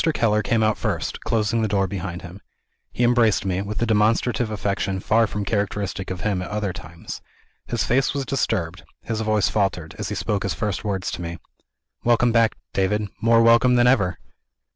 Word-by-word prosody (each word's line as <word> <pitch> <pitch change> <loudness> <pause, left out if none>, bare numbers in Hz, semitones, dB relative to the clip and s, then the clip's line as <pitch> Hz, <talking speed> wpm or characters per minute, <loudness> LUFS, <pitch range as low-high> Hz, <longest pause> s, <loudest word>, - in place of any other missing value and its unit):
Keller 105 -2 +2
came 110 0 +1
out 110 0 +1
first, - - -2
closing 115 0 0
the 110 - +1
door 100 -1 +1
behind 90 -2 -5
him. 90 +3 -10 0.5
He 125 - -1
embraced 120 -4 +3
me, 95 0 0
with 105 +1 -4
a - - +3
demonstrative 110 +2 +2
affection 100 -2 -2
far 115 +4 +3
from 105 0 -4
characteristic 100 -2 -2
of 90 -1 -5
him 100 -4 0
at 90 - -6
other 105 -3 -2
times. 85 +1 -9 0.5
His - - -1
face 135 +2 +2
was 140 -1 -3
disturbed; 100 -10 -1 0.2
his 110 -1 -3
voice 110 -2 +2
faltered, 95 -6 -1
as - - -3
he - - -3
spoke 105 -2 -1
his - - -2
first 105 -5 -2
words 95 -3 -2
to - - -5
me. 85 0 -5 0.7
"Welcome 120 0 +3
back, 115 -1 +3 0.2
David 100 +2 0
more 115 +1 +5
welcome 115 +2 +5
than 120 0 +4
ever!" 100 -9 +3
105 Hz, 185 wpm, -23 LUFS, 95-115 Hz, 0.7 s, more